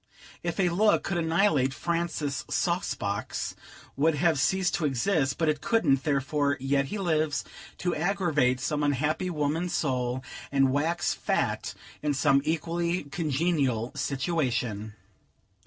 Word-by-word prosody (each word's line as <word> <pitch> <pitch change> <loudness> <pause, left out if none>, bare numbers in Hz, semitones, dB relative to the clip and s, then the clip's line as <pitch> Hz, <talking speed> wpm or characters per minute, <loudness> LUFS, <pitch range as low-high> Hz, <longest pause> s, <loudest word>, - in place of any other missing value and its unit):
If - - -3
a 180 -2 +3
look 205 +5 +3
could 175 -3 -1
annihilate, 160 -5 +2
Francis 170 -4 -2
Saucebox 110 - -1 0.4
would 155 +3 +2
have 155 0 +2
ceased 185 +6 +2
to 165 - 0
exist; 140 0 +1
but 160 - +1
it 150 -1 +1
couldn't; 140 - +2
therefore, 145 0 +1
he 135 - -9
yet 140 -1 +1
lives, 160 -7 0 0.3
to 175 -1 -1
aggravate 155 -8 +1
some 150 +3 -1
unhappy 150 +5 0
woman's 160 +2 -1
soul, 130 -3 -1 0.3
and 135 -1 +3
wax 165 +5 +1
fat - - -1 0.3
in 150 -1 0
some 140 0 +4
equally 170 +3 -1
congenial 140 -5 0
situation. 125 - -1
150 Hz, 125 wpm, -28 LUFS, 135-170 Hz, 0.4 s, some